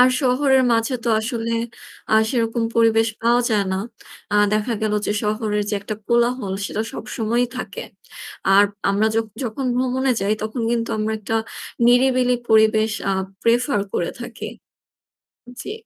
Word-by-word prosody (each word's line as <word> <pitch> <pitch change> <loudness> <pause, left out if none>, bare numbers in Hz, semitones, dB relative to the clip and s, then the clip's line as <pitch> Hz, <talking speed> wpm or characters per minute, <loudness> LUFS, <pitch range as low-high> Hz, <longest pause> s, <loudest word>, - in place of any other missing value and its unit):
আর 250 - +8
শহরের 265 0 +3
মাঝে 230 +3 +1
তো 235 - 0
আসলে 230 0 -3 0.6
আ - - +6 0.2
সেরকম 230 -1 0
পরিবেশ 225 0 +4
পাওয়া 240 +1 +4
যায় 210 -2 +2
না। 190 - -1 0.5
আ - - +1 0.2
দেখা 215 +3 0
গেল 215 -1 0
যে 205 - +1
শহরের 210 0 -1
যে - - 0
একটা 215 +1 -5
কোলাহল 235 -3 +1
সেটা 215 - -2
সবসময়ই 240 -1 -1
থাকে। - - -5 0.7
আর 200 +1 +7 0.3
আমরা 205 +2 +2
য - - 0 0.3
যখন 245 +3 -3
ভ্রমণে 260 +1 +1
যাই 205 +2 +1
তখন 220 +2 -3
কিন্তু 230 -1 -1
আমরা 215 +1 -1
একটা 215 +1 -2 0.5
নিরিবিলি 250 0 +4
পরিবেশ 220 0 +4 0.2
আ - - +2 0.3
prefer 245 +1 +2 0.2
করে 170 - 0
থাকি। 240 -1 -7 1.1
জি। - - -6
230 Hz, 150 wpm, -21 LUFS, 215-250 Hz, 1.1 s, আর